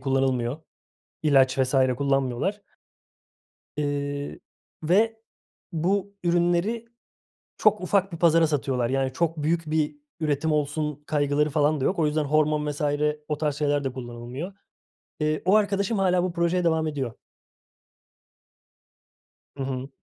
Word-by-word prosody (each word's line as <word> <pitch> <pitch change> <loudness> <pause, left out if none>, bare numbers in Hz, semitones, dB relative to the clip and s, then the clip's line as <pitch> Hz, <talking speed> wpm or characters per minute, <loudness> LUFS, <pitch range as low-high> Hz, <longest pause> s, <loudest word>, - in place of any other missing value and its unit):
kullanılmıyor, 130 0 0 0.6
ilaç 135 -3 +4
vs. 130 +1 +1 0.2
kullanmıyorlar. 135 - 0 1.1
Iıı, 145 -1 -3 0.4
ve 220 +7 +2 0.5
bu 195 +5 0
ürünleri 175 +6 +1 0.7
çok 215 -2 +4
ufak 195 0 +1
bir 165 - -5
pazara 165 -1 +5
satıyorlar. 130 -5 0
Yani, 135 -1 0
çok 165 +2 0
büyük 165 +1 0
bir 155 - 0 0.2
üretim 155 +1 0
olsun 150 0 -1
kaygıları 150 0 +1
falan 150 0 +2
da - - 0
yok. 185 - 0
O 155 - +3
yüzden 150 0 0
hormon 150 0 +2
vs. 145 +1 -5 0.5
o 150 -1 -2
tarz 150 -2 -1
şeyler 145 -1 0
de 130 - -2
kullanılmıyor. 125 +7 -7 0.7
Iıı, 155 0 0
o 185 +3 +4
arkadaşım 200 0 +1
hâlâ 180 -2 +3
bu 180 -1 -1
projeye 170 +1 +1
devam 160 -1 +2
ediyor. 135 -6 -3 2.4
Hı 135 - -4
hı. 130 0 -4
150 Hz, 125 wpm, -25 LUFS, 140-170 Hz, 2.4 s, pazara